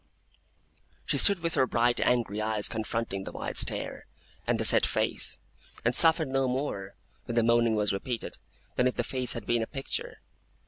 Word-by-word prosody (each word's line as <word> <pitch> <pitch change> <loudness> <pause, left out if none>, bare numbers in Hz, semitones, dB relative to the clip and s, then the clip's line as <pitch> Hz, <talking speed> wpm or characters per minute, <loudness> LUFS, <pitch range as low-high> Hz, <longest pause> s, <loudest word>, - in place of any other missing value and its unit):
She - - +1
stood 200 -4 +6
with 165 -1 0
her 130 - +2
bright 120 +1 +1
angry 115 -4 0
eyes 110 -1 +1
confronting 110 -3 -4
the - - -8
wide - - -6
stare, - - -1 0.4
and - - 0
the - - -1
set - - +5
face; - - 0 0.5
and 115 - +2
softened 160 -4 +6
no 135 0 0
more, 125 -7 -4 0.3
when 120 - -5
the 115 - +2
moaning 115 -1 +2
was 105 -1 0
repeated, 115 +4 -5 0.4
than 125 - +2
if 125 - -2
the 120 - -1
face 125 0 0
had 115 -3 -7
been 120 -1 0
a 110 - -3
picture. 135 -2 -5
120 Hz, 180 wpm, -27 LUFS, 110-130 Hz, 0.5 s, stood